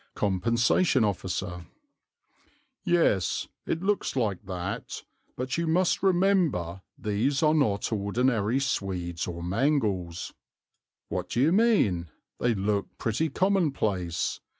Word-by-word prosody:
Compensation 115 - +2
Officer. 90 -3 -3 1.2
"Yes, 170 - +2 0.2
it 165 - -1
looks 205 -5 0
like 110 -6 -1
that; 90 +1 -5 0.3
but 130 +5 -2
you 170 - -1
must 175 +3 +2
remember 175 - +2 0.2
these 120 +9 0
are 155 0 +5
not 115 -8 +1
ordinary 110 +3 +1
swedes 90 -9 -2
or 85 -1 -5
mangles." 95 - 0
Author. - - -46 0.7
"What - - -3
do - - -1
you 150 +4 +4
mean? 180 - +3 0.3
They 120 -2 +1
look 100 +1 -1
pretty 120 +8 0
commonplace. 135 - 0
110 Hz, 110 wpm, -27 LUFS, 95-155 Hz, 1.2 s, are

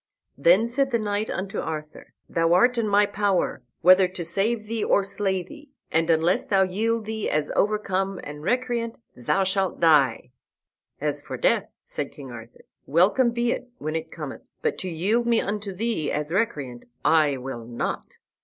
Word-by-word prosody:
Then 175 +10 +4
said 265 +3 0
the 240 - +2
knight 210 0 -2
unto 195 +1 -3
Arthur, 155 -1 -6
"Thou 165 0 +2
art 245 +6 +4
in 225 - 0
my 205 0 +4
power, 200 -2 0 0.2
whether 185 +1 +7
to 180 -2 -7
save 215 +6 0
thee 225 0 -2
or 200 - +3
slay 195 -1 -1
thee, 295 - -14 0.2
and 165 +1 +1
unless 165 +2 +3
thou 195 -1 +4
yield 220 +4 -1
thee 220 -1 -3
as 150 0 0
overcome 195 -2 0
and 150 0 -8
recreant, 235 +3 -1 0.2
thou 125 +11 +1
shalt 190 0 0
die." 135 -7 +3 0.7
"As - - -1
for - - -6
death," - - +2 0.2
said - - -4
King 135 -3 -10
Arthur, 115 -1 -12 0.2
"welcome 195 - +4
be 235 0 0
it 250 - -4
when 155 +1 -4
it 160 0 -3
cometh; 150 -5 -7 0.2
but - - 0
to 185 - -4
yield 205 +9 0
me 235 -1 +4
unto 205 0 -3
thee 200 -5 -1
as 150 +1 -3
recreant, 145 - -2 0.2
I 150 -4 +4
will 125 -2 -6
not." 120 0 -4
190 Hz, 175 wpm, -25 LUFS, 160-220 Hz, 0.7 s, whether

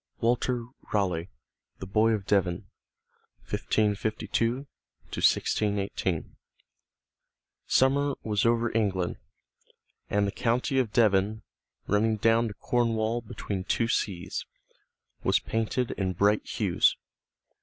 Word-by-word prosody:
III - - -48
Walter 120 +1 +1 0.3
Raleigh 90 -4 0 0.5
The - - -7
Boy 110 +4 +3
of 105 -3 -2
Devon: 95 -2 +1 0.8
1552 110 - 0 0.5
1618 100 -4 0 1.3
Summer 140 +1 +3
was 105 -2 0
over 115 -1 +2
England, 95 -5 0 0.9
and 100 0 +2
the 100 - -1
county 125 +4 0
of 120 -5 0
Devon, 105 -1 +2 0.4
running 110 +2 +2
down 115 +2 +3
to 105 - -7
Cornwall 115 -1 0
between 105 -4 -5
two 115 +4 0
seas, 95 -5 -2 0.8
was - - +3
painted 115 +2 -1
in 95 -2 -2
bright 100 +4 +2
hues. - - +2
110 Hz, 100 wpm, -28 LUFS, 100-115 Hz, 1.3 s, Boy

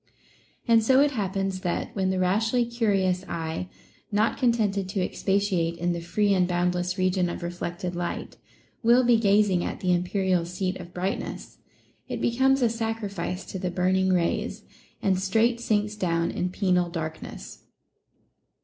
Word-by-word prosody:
And 230 -1 +6
so 260 +4 +5
it 290 0 +4
happens 195 -4 -2
that, 175 -2 -3
when 190 -2 +1
the 190 - 0
rashly 220 +6 +2
curious 200 -6 +1
eye, 165 +2 -4 0.4
not 210 +2 +2
contented 210 -6 +1
to 195 - -2
expatiate 185 -3 0
in 175 +1 0
the 170 - -4
free 200 +4 +1
and 180 -2 +3
boundless 180 +1 0
region 185 -1 +1
of 175 - -5
reflected 175 +1 -4
light, 175 0 -4 0.5
will 240 +2 +5
be 240 -1 +5
gazing 200 -4 +3
at - - -4
the 180 -1 +1
imperial 180 0 +1
seat 185 +2 -3
of 175 -1 -10
brightness, 185 +2 -4 0.5
it - - -4
becomes 265 +2 +2
a - - +5
sacrifice 215 -5 -3
to 190 - -6
the 180 - -2
burning 185 +1 +1
rays, 175 -2 0 0.4
and 190 -2 +2
straight 225 +5 +2
sinks 210 -2 0
down 170 -4 0
in 180 - -2
penal 180 -2 +1
darkness. 160 -2 -7
190 Hz, 150 wpm, -26 LUFS, 180-215 Hz, 0.5 s, And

